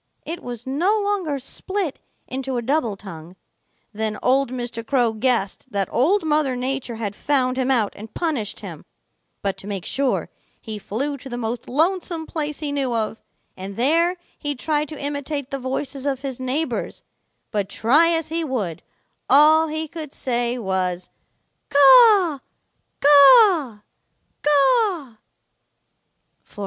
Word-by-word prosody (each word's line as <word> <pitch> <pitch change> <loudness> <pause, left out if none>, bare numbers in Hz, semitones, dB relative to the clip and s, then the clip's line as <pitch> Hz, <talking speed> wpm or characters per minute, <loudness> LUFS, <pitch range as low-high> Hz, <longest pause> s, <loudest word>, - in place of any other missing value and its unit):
It 335 +2 -5
was 240 -1 -7
no 345 +11 +1
longer 400 -8 -1
split 360 +5 -4 0.3
into 265 0 -4
a 240 - -2
double 245 -5 0
tongue. 175 -3 -11 0.6
Then 215 0 -2
old 265 +1 +2
Mr. 240 -2 -5
Crow 240 -2 +1
guessed 235 +1 -1
that 200 -3 -1
Old 330 - +2
Mother 300 -4 +1
Nature 255 -1 -3
had 210 -3 -4
found 255 -2 +1
him 260 0 -1
out 235 -6 +2
and 215 +1 -10
punished 285 - -3
him, - - -9 0.6
but 195 -1 -1
to 195 - -11
make 195 -3 -4
sure, 275 -1 -1 0.3
he 215 -2 -7
flew 275 +9 -3
to 270 0 -11
the 240 - -5
most 235 0 -4
lonesome 330 +3 0
place 300 -1 -4
he 295 -2 -1
knew 270 -4 -1
of, 220 0 -2 0.3
and 195 +1 -8
there 335 +8 +2 0.2
he 290 -1 -1
tried 300 +3 -1
to 305 - -8
imitate 285 -1 -4
the 275 - -3
voices 265 +1 -3
of 270 -1 -2
his 265 -3 -4
neighbors; 265 +5 -2 0.5
but 205 -3 -2
try 295 +9 +3
as 325 -2 -1
he 330 +1 -1
would, 215 - -3 0.5
all 310 +4 +6
he 315 +1 -3
could 310 -2 -8
say 240 -1 -1
was 185 -4 -2 0.6
'Caw, 345 - +6 0.6
caw, 290 - +6 0.6
caw.' 295 - +2
270 Hz, 140 wpm, -22 LUFS, 235-310 Hz, 0.6 s, all